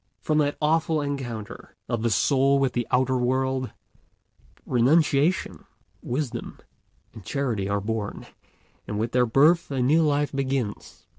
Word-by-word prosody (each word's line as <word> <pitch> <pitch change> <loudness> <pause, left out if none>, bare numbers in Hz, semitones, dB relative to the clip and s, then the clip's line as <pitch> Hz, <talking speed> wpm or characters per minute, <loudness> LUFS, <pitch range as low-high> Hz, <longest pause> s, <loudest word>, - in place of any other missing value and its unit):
From 155 0 0
that 145 -1 0
awful 160 +1 +1
encounter 125 -7 -6
of 120 -3 -2
the 115 - +1
soul 135 +5 +3
with 135 -2 +1
the 120 -2 -2
outer 130 0 +1
world, 130 +1 0 1.0
renunciation, 145 +6 +2 0.4
wisdom, 125 -2 -4 0.6
and 110 -4 -11
charity 115 -6 -2
are 100 0 0
born; 110 0 -4 0.6
and 105 - -4
with 115 +2 -2
their 125 0 +2
birth 155 +9 +4
a 135 -2 -2
new 145 +6 +3
life 145 -2 +1
begins. 135 -6 -3
130 Hz, 135 wpm, -25 LUFS, 120-145 Hz, 1.0 s, birth